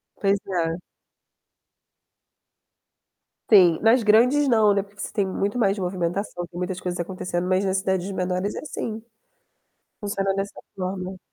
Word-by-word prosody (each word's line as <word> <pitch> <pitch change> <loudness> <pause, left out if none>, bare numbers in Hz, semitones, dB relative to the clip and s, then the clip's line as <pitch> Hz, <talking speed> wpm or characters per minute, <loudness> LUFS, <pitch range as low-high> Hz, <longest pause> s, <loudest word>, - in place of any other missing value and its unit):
Pois 200 0 +2
é. 170 -3 -1 2.7
Sim. 180 -6 +6
Nas 225 +2 +4
grandes 245 +7 +5
não, 220 -3 +5
né, 200 -1 +1
porque 205 +1 -22
você - - -5
tem 200 - +1
muito 200 +4 -2
mais 205 -3 +2
movimentação, 180 0 -2
tem 175 - -12
muitas 180 +1 -3
coisas 180 -1 -3
acontecendo, 180 0 -3
mas 185 +1 +2
nas 190 0 +1
cidades 190 0 -1
menores 185 +1 -1
é - - -4
assim, 225 -7 -5 1.0
funciona 195 -1 -1
dessa 195 +1 -4 0.2
forma. 185 0 -4
195 Hz, 140 wpm, -24 LUFS, 180-205 Hz, 2.7 s, Sim